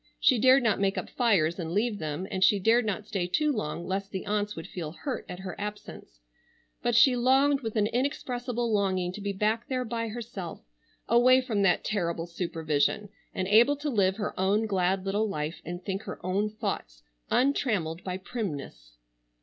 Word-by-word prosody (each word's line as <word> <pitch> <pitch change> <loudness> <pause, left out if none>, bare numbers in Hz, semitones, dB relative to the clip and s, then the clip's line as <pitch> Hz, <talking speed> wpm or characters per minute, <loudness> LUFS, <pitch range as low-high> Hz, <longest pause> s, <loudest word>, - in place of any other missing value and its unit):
She 255 -4 +4
dared 260 +2 +6
not 220 -4 +2
make 195 0 +1
up - - -4
fires 190 -9 +2
and 165 -1 -4
leave 210 +1 0
them, 155 +3 -3
and 190 0 0
she 200 +2 +5
dared 225 +4 +3
not 210 +1 -2
stay 195 -5 -2
too 300 - +1
long 170 - -3
lest 195 +1 -3
the 190 -2 -5
aunts 210 0 -1
would 165 - -7
feel 165 -4 -6
hurt 265 +6 -5
at 180 +1 -7
her 190 - -5
absence, 205 - -8 0.6
but 240 - +1
she 250 +2 +6
longed 270 +3 +3
with 225 -2 -4
an 210 -2 +3
inexpressible 245 -1 -2
longing 190 -3 +1
to 205 - -7
be 200 0 -2
back 215 +4 0
there 255 -1 -1
by 230 0 -3
herself, 215 -6 -7 0.4
away 245 +3 +6
from 235 -6 -1
that 195 -2 +3
terrible 170 -5 -1
supervision 170 +3 -1 0.3
and 185 -1 -1
able 230 +8 +5
to 290 +1 -3
live 195 -4 +2
her 210 - -3
own 200 +4 +2
glad 190 -2 0
little 205 +3 0
life 155 -3 -4
and 175 +2 -7
think 195 0 -2
her - - -7
own 200 +3 0
thoughts - - -5 0.3
untrammeled 215 - +1
by 185 -1 -3
primness. 145 - -6
205 Hz, 185 wpm, -28 LUFS, 180-235 Hz, 0.6 s, dared